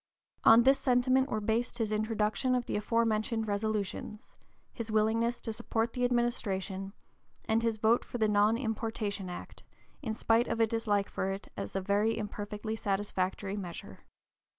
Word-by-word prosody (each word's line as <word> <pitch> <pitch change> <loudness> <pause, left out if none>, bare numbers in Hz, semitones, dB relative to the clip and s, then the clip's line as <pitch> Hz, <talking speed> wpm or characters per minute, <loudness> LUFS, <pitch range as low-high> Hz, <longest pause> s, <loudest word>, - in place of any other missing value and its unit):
On 225 +1 +8
this 270 +2 +5
sentiment 255 +1 +3
were 215 - -1
based 225 +3 -1
his 225 -3 -1
introduction 215 +3 0
of 245 -1 -1
the - - -3
aforementioned 220 +1 0
resolutions, 210 +1 -3 0.4
his 230 -1 -5
willingness 225 +2 +2
to 225 - -4
support 225 +1 -1
the 250 - -2
administration, 200 -6 -1 0.5
and 225 +1 +2
his 230 -1 0
vote 225 +2 +3
for - - -6
the 220 -2 +2
Non 210 +2 +3
importation 220 -5 -3
Act 175 - -8 0.4
in 225 -6 -3
spite 225 +2 +2
of - - -2
a 225 - +6
dislike 215 -3 0
for 190 - -2
it 195 0 -5
as - - -6
a 195 - 0
very 205 +3 +1
imperfectly 210 0 -4
satisfactory 195 -1 -2
measure. 180 -4 -7
220 Hz, 155 wpm, -31 LUFS, 205-230 Hz, 0.5 s, On